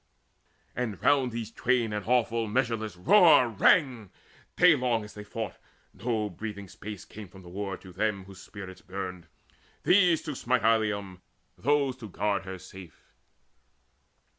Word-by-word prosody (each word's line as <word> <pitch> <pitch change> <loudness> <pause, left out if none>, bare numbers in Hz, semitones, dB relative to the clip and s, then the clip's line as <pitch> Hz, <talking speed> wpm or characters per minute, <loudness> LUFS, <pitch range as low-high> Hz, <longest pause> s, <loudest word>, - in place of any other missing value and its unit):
And 115 -6 -3
round 135 -3 +3
these 115 -1 -5
twain 120 -3 0
an 105 -1 -3
awful 115 -2 +1
measureless 110 -3 -1
roar 155 - +6
Rang, 115 - +3 0.5
daylong 125 -10 +4
as 105 - -11
they 105 - -9
fought: 110 -1 -6 0.4
no 110 -3 -2
breathing 100 +1 -7
space 100 +1 -9
Came 105 -1 -10
from 95 +1 -15
the 90 - -12
war 95 +1 -4
to 95 -2 -14
them 100 0 -1
whose 95 -1 -13
spirits 95 -3 -10
burned, 90 -2 -6 0.6
These, 180 -4 +4
to 155 - -4
smite 125 -2 0
Ilium, 105 -4 +1 0.3
those, 140 -2 +1
to 110 -5 -9
guard 100 0 -1
her 95 -1 -6
safe. 95 -2 -14
110 Hz, 140 wpm, -28 LUFS, 95-125 Hz, 0.6 s, roar